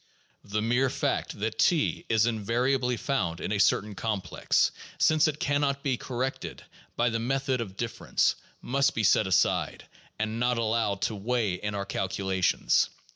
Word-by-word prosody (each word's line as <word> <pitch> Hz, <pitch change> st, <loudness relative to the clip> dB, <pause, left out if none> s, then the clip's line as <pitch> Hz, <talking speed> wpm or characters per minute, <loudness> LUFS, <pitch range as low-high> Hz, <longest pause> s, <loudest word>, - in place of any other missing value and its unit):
The 105 Hz, +1 st, -2 dB
mere 125 Hz, +4 st, +2 dB
fact -, -, -2 dB
that 110 Hz, +1 st, -2 dB
T 170 Hz, +1 st, +2 dB
is 110 Hz, -1 st, +4 dB
invariably 120 Hz, +3 st, 0 dB
found 90 Hz, -, -1 dB
in -, -, -4 dB
a 105 Hz, -, 0 dB
certain 105 Hz, +1 st, +2 dB
complex, 105 Hz, -1 st, 0 dB, 0.3 s
since 155 Hz, -1 st, +4 dB
it 155 Hz, -1 st, -3 dB
can 145 Hz, -3 st, +1 dB
not 140 Hz, -1 st, 0 dB
be 135 Hz, -3 st, +1 dB
corrected 130 Hz, +2 st, -4 dB, 0.3 s
by 120 Hz, 0 st, +2 dB
the 115 Hz, -, -1 dB
method 130 Hz, +1 st, 0 dB
of 100 Hz, -4 st, -7 dB
difference, 115 Hz, -1 st, 0 dB, 0.3 s
must 140 Hz, +2 st, +1 dB
be 110 Hz, -, 0 dB
set 105 Hz, 0 st, +4 dB
aside, 95 Hz, -1 st, +1 dB, 0.3 s
and 110 Hz, +1 st, -2 dB
not 120 Hz, 0 st, +1 dB
allowed 110 Hz, -3 st, 0 dB
to 110 Hz, -, 0 dB
weigh 110 Hz, -1 st, 0 dB
in 105 Hz, +3 st, -4 dB
our 100 Hz, -1 st, -3 dB
calculations. 95 Hz, -1 st, +1 dB
115 Hz, 160 wpm, -28 LUFS, 105-130 Hz, 0.3 s, is